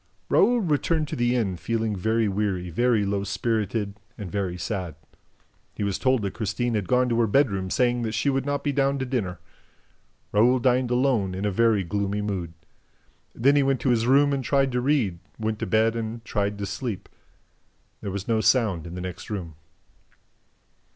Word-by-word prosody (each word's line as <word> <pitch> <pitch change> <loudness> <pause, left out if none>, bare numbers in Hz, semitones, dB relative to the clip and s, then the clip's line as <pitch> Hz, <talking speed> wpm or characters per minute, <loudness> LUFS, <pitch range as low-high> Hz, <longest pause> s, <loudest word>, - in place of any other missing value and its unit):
Raoul 240 +4 +4
returned 155 -2 0
to - - -3
the 120 +1 +1
inn 100 -7 0
feeling 110 +2 -1
very 110 +4 +1
weary, 95 -3 -1
very 115 +2 +2
low 100 0 -1
spirited 105 -1 -2 0.2
and 100 -6 -7
very 95 -3 -2
sad. 90 -4 -4 0.8
He - - -3
was 100 -2 -1
told 130 -4 +2
that 100 - -2
Christine 115 +2 -2
had 105 -4 -1
gone 125 +3 +3
to 115 0 +1
her 115 - +3
bedroom 100 -6 +1
saying 120 +2 +1
that 110 -2 -2
she 115 +6 -1
would 135 -1 +1
not 145 0 -2
be 145 - +1
down 140 0 +1
to 130 - -2
dinner. 105 -10 -2 0.9
Raoul 120 +5 +4
dined 125 0 +2
alone, 125 -7 +1
in 95 +2 -3
a 105 - +1
very 110 0 +3
gloomy 100 +3 -2
mood. 90 -5 -3 0.8
Then 140 +5 +4
he 145 - +5
went 135 -2 +1
to 130 - +1
his 115 -1 +1
room 140 +2 +4
and 135 -1 -1
tried 135 +1 +2
to 125 0 0
read, 120 - +1 0.2
went 110 -1 -2
to - - -3
bed 110 +3 +2
and 115 0 -5
tried 100 -1 -1
to 100 - -3
sleep. 105 +1 -4 0.9
There 100 - -4
was 100 0 -5
no 110 -1 +2
sound 105 - +2
in 85 - -8
the 90 - -5
next 90 -1 -7
room. 90 -6 -5
110 Hz, 190 wpm, -25 LUFS, 100-125 Hz, 0.9 s, he